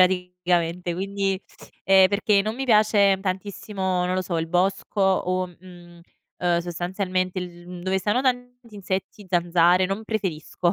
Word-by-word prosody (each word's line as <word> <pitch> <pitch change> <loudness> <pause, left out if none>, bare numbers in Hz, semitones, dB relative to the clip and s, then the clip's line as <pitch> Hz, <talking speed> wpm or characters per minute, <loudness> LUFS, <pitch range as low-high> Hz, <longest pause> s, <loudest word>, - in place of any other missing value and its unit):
praticamente. 180 -1 +1
Quindi, 195 0 -1 0.5
ehm, 190 -1 +6
perché 200 0 +2
non 215 +2 -2
mi 270 +1 -3
piace 210 -4 +4
tantissimo, 190 -1 -2
non 180 - -1
lo 185 - 0
so, 170 -3 -2
il 165 - -2
bosco 190 +3 0
o, 185 -1 +1
mhmm, 175 -1 -15 0.4
ehm, 175 -1 +1
sostanzialmente 185 +2 -2
il 175 0 -8
dove 190 +1 0
stanno 210 +7 0
tanti 245 -3 -3
insetti, 195 +1 -4
zanzare 175 +1 +3
non 195 +4 -3
preferisco 180 -5 -2
185 Hz, 140 wpm, -24 LUFS, 180-200 Hz, 0.5 s, ehm